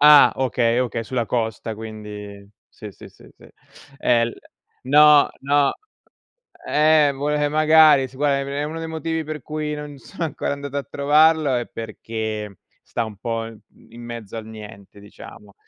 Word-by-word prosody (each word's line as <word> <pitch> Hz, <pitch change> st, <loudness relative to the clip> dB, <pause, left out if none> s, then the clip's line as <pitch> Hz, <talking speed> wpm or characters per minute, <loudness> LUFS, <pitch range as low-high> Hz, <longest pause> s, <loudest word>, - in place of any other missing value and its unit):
Ah, 150 Hz, 0 st, +8 dB
okay, 120 Hz, -2 st, +1 dB
okay, 120 Hz, -2 st, -2 dB
sulla 120 Hz, 0 st, -2 dB
costa 110 Hz, -1 st, -3 dB
quindi 105 Hz, -2 st, -9 dB, 0.2 s
sì, -, -, -11 dB
sì, -, -, -14 dB
sì, -, -, -19 dB
sì. -, -, -17 dB, 0.5 s
E 120 Hz, -1 st, +2 dB
il 115 Hz, -, -3 dB, 0.5 s
no, 150 Hz, +2 st, +6 dB
no. 140 Hz, 0 st, +2 dB, 1.0 s
Eh, 150 Hz, -1 st, +4 dB
vole 145 Hz, +1 st, 0 dB
magari, 155 Hz, -2 st, +5 dB
si 130 Hz, -, -17 dB
guarda, 140 Hz, 0 st, +1 dB
em 140 Hz, -, -5 dB
è 140 Hz, +1 st, -3 dB
uno 155 Hz, +2 st, -5 dB
dei 165 Hz, -, -5 dB
motivi 160 Hz, 0 st, -3 dB
per 155 Hz, -1 st, -6 dB
cui 150 Hz, 0 st, -4 dB
non 150 Hz, -1 st, -8 dB
sono 170 Hz, +5 st, -6 dB
ancora 155 Hz, -, -3 dB
andato 140 Hz, 0 st, -6 dB
a 140 Hz, -, -1 dB
trovarlo 150 Hz, +1 st, +3 dB
è 120 Hz, -1 st, -1 dB
perché 110 Hz, -2 st, -6 dB, 0.2 s
sta 115 Hz, -, -3 dB
un 110 Hz, -2 st, -9 dB
po', 115 Hz, +2 st, -3 dB
mhmm, 115 Hz, -1 st, -15 dB
in 120 Hz, -, -11 dB
mezzo 115 Hz, -3 st, -8 dB
al 110 Hz, -1 st, -7 dB
niente, 105 Hz, -2 st, -12 dB
diciamo. 100 Hz, 0 st, -14 dB
135 Hz, 165 wpm, -21 LUFS, 110-150 Hz, 1.0 s, Ah